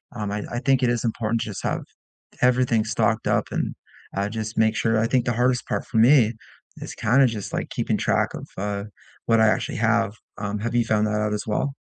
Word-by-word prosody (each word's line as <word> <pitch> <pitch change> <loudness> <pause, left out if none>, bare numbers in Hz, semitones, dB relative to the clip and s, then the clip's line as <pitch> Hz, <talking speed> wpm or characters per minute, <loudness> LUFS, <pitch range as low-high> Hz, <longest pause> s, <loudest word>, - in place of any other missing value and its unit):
um, 105 -2 -3
I 105 0 -3
I 120 - -2
think 135 -1 +3
it 120 - +3
is 120 -1 0
important 115 0 -1
to - - -3
just 100 - -6
have - - -1 0.6
everything 125 -3 +3
stocked 110 0 0
up - - +2
and, - - -2 0.4
uh, 100 +1 0
just 110 0 -5
make 110 0 +3
sure 115 -1 +1
I 115 - +2
think 125 0 +1
the 120 - 0
hardest 125 +1 +1
part - - -2
for 115 - -1
me 120 -1 +5 0.5
is - - -7
kinda 130 +4 +4
just, 110 -4 -4
like, - - -2
keeping - - -1
track - - +1
of, - - -7
uh, 100 0 -2 0.4
what 115 -1 +4
I 110 - +6
actually - - 0
have, 115 -2 +2 0.2
um, 105 0 -3
have 115 +2 -3
you 120 -1 +3
found 110 -1 +1
that 105 0 0
out 105 0 0
as 105 - -4
well? 135 +6 -1
110 Hz, 225 wpm, -24 LUFS, 105-120 Hz, 0.6 s, I